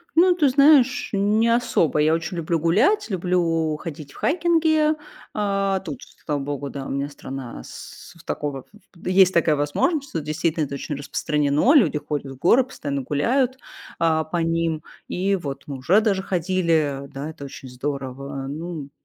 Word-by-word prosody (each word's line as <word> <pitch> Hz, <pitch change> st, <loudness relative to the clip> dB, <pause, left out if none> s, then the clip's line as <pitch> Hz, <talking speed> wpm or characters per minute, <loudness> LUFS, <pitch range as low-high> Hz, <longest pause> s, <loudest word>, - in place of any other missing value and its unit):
Ну, 355 Hz, +2 st, +6 dB
ты 305 Hz, -6 st, +3 dB
знаешь, 275 Hz, -2 st, +5 dB
не 210 Hz, +3 st, +2 dB
особо. 230 Hz, -10 st, +2 dB
Я 155 Hz, +1 st, +3 dB
очень 165 Hz, +2 st, -3 dB
люблю 165 Hz, 0 st, 0 dB
гулять, 195 Hz, -, +2 dB
люблю 170 Hz, -5 st, 0 dB
ходить 150 Hz, -4 st, -8 dB
в -, -, -16 dB
хайкинги. 320 Hz, -2 st, +2 dB, 0.4 s
А, 195 Hz, -2 st, 0 dB
тут, 150 Hz, -8 st, -7 dB, 0.2 s
слава 150 Hz, -1 st, -1 dB
богу, 140 Hz, 0 st, -4 dB
да, 135 Hz, -1 st, -6 dB
у -, -, -6 dB
меня 140 Hz, +1 st, -2 dB
страна 135 Hz, -, -8 dB
с -, -, -11 dB
такого 145 Hz, -2 st, -3 dB
ф -, -, -21 dB, 0.4 s
есть 185 Hz, 0 st, +5 dB
такая 165 Hz, -3 st, +3 dB
возможность. 275 Hz, -, 0 dB
Тут 165 Hz, -, -2 dB
действительно 155 Hz, +1 st, 0 dB
это 140 Hz, 0 st, -6 dB
очень 145 Hz, +1 st, -4 dB
распространено. 145 Hz, -, +1 dB
Люди 170 Hz, -, +4 dB
ходят 145 Hz, -2 st, -4 dB
в 135 Hz, -, -9 dB
горы, 230 Hz, -, +4 dB
постоянно 140 Hz, -, -4 dB
гуляют, 250 Hz, -, +1 dB, 0.4 s
а, 160 Hz, -1 st, +2 dB
по 155 Hz, +3 st, -4 dB
ним. 165 Hz, -1 st, 0 dB, 0.3 s
И 195 Hz, +2 st, 0 dB
вот 140 Hz, -5 st, -6 dB
мы 140 Hz, -, -5 dB
уже 180 Hz, +11 st, +4 dB
даже 200 Hz, -3 st, +1 dB
ходили. 165 Hz, -7 st, 0 dB
Да, 140 Hz, +2 st, -6 dB
это 155 Hz, -3 st, -10 dB
очень 135 Hz, -1 st, -10 dB
здорово. 135 Hz, +1 st, -5 dB
Ну, 155 Hz, -1 st, -6 dB
165 Hz, 165 wpm, -23 LUFS, 145-200 Hz, 0.4 s, Ну